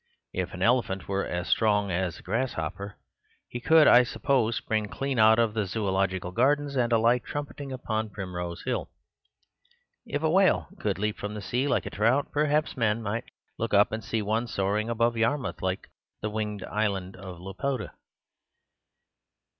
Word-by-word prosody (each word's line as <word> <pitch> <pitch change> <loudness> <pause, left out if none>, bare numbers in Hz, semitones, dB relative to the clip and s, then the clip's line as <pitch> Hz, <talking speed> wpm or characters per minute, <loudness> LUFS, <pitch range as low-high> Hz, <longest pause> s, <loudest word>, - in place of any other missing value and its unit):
If 90 0 -3
an 90 - -3
elephant 115 -5 +1
were 100 0 -1
as 90 0 -3
strong 105 -3 +2
as 90 0 -1
a - - -13
grasshopper, 100 -5 -3 0.5
he 120 - -6
could 160 +5 +6
(I 120 - +8
suppose) 125 -2 +1
spring 110 -3 -1
clean 135 +2 -2
out 110 0 +7
of 115 -2 +2
the 105 -3 -1
Zoological 95 -3 -1
Gardens 140 +6 +2
and 120 -2 +1
alight 115 +2 +3
trumpeting 145 -1 -6
upon 110 -4 -2
Primrose 90 -3 -5
Hill. 125 -1 -2 1.2
If 145 - -2
a 160 - +3
whale 190 +2 +3
could 105 -3 -1
leap 105 +1 -2
from 105 +1 -4
the - - -4
sea 125 +7 -1
like 140 - +1
a - - -5
trout, 115 +7 +1
perhaps 150 +1 +1
men 115 -3 +1
might 110 +4 -2 0.3
look 115 -2 0
up 100 +1 +5
and 110 0 -4
see 110 +2 -1
one 110 +4 0
soaring 105 +1 -1
above 115 0 +1
Yarmouth 115 -3 0
like 95 0 -2 0.4
the 105 - -1
winged 105 -2 -3
island 100 -3 -2
of 95 -2 -9
Laputa. 105 +7 -3
110 Hz, 165 wpm, -27 LUFS, 100-125 Hz, 1.2 s, I